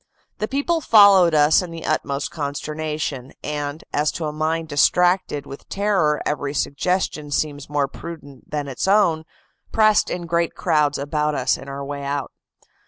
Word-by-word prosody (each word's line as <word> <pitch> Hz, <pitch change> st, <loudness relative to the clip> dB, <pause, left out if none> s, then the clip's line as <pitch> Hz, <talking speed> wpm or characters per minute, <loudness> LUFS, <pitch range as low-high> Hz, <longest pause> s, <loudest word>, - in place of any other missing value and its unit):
The 215 Hz, -, -1 dB
people 285 Hz, +6 st, 0 dB
followed 200 Hz, -, +6 dB
us 150 Hz, +3 st, +5 dB
in 180 Hz, -, -6 dB
the 165 Hz, -1 st, -8 dB
utmost 140 Hz, -2 st, -1 dB
consternation, 150 Hz, -2 st, -4 dB
and, 145 Hz, 0 st, -4 dB
as 150 Hz, +1 st, +1 dB
to 165 Hz, -, -4 dB
a 150 Hz, -, -3 dB
mind 160 Hz, +1 st, -1 dB
distracted 175 Hz, +1 st, +2 dB
with 135 Hz, -, -11 dB
terror 190 Hz, -7 st, +1 dB
every 145 Hz, -1 st, -2 dB
suggestion 150 Hz, 0 st, -1 dB
seems 145 Hz, -1 st, -2 dB
more 145 Hz, -1 st, +1 dB
prudent 145 Hz, -3 st, -10 dB
than 145 Hz, -1 st, -3 dB
its 135 Hz, +6 st, -3 dB
own, 185 Hz, -6 st, +3 dB, 0.5 s
pressed 215 Hz, -1 st, +4 dB
in 175 Hz, -1 st, -4 dB
great 170 Hz, 0 st, 0 dB
crowds 150 Hz, -2 st, +1 dB
about 150 Hz, +1 st, -1 dB
us 130 Hz, -1 st, +1 dB
in -, -, -10 dB
our 140 Hz, 0 st, -5 dB
way 140 Hz, 0 st, -5 dB
out. 140 Hz, 0 st, -3 dB
150 Hz, 160 wpm, -22 LUFS, 145-170 Hz, 0.5 s, followed